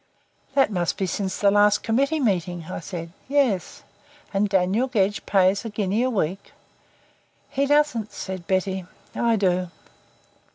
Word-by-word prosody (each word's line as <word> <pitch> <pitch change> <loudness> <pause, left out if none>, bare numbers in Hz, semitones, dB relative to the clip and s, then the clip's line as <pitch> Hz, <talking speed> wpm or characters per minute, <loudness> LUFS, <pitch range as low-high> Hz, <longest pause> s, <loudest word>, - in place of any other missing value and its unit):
"That 270 -5 +4
must 175 -3 -1
be 195 - 0
since 190 +1 -2
the 200 -1 +3
last 205 0 +4
Committee 275 +7 +1
Meeting," 180 - -1
I - - -4
said. 170 -1 -7 0.2
"Yes." 265 -10 0 0.5
"And 200 +1 +1
Daniel 195 +6 +2
Gedge 205 -5 0
pays 195 0 +3
a 225 - -4
guinea 205 +1 -1
a 255 - +2
week?" 195 -5 -2 1.0
"He 280 +1 0
doesn't," 290 -7 +2
said 185 -3 -6
Betty. 190 -1 -1 0.3
"I 235 -1 +2
do." 185 -3 +1
200 Hz, 140 wpm, -24 LUFS, 185-230 Hz, 1.0 s, That